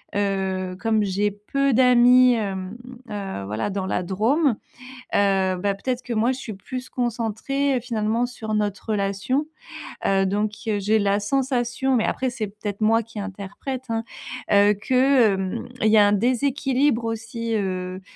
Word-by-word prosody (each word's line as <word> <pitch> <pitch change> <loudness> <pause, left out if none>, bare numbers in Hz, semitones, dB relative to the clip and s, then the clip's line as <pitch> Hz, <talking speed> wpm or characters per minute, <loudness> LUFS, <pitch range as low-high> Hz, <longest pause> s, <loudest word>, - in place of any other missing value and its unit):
heu, 190 -2 -1
comme 220 -1 +1
j'ai 200 +1 0
peu 270 +7 -1
d'amis, 250 0 +6
hem 195 -1 -4 0.3
heu, 195 - -5
voilà 105 - -2
dans 195 -1 -3
la 190 - -1
Drôme. 230 - +2 0.6
Heu, 195 -2 +2
bah, 200 +2 0
peut-être 250 +5 -3
que 245 - -5
moi, 225 +3 +2
je 260 - -6
suis 225 - -6
plus 255 +6 -7
concentrée, 245 +3 -1
finalement, 230 0 0
sur 220 -3 -5
notre 210 +1 -2
relation. 200 +8 0 0.6
Heu, 195 0 +3
donc 205 +2 0 0.2
heu, 210 -2 +1
j'ai 215 +2 +2
la 200 0 +2
sensation- 260 +2 0
mais 220 - +1
après, 260 - -1
c'est 240 -4 -4
peut-être 205 0 -6
moi 225 +2 +3
qui 220 -1 -9
interprète, 205 +7 -6
hein, 225 0 -1 0.5
heu, 205 +1 +6
que, 255 +2 +3
hem 190 +4 -3
il 220 - +3
y 220 - +5
a 205 - +7
un - - +3
déséquilibre 255 +2 +1
aussi, 225 0 -3
heu, 185 -2 -3
215 Hz, 160 wpm, -23 LUFS, 200-245 Hz, 0.6 s, a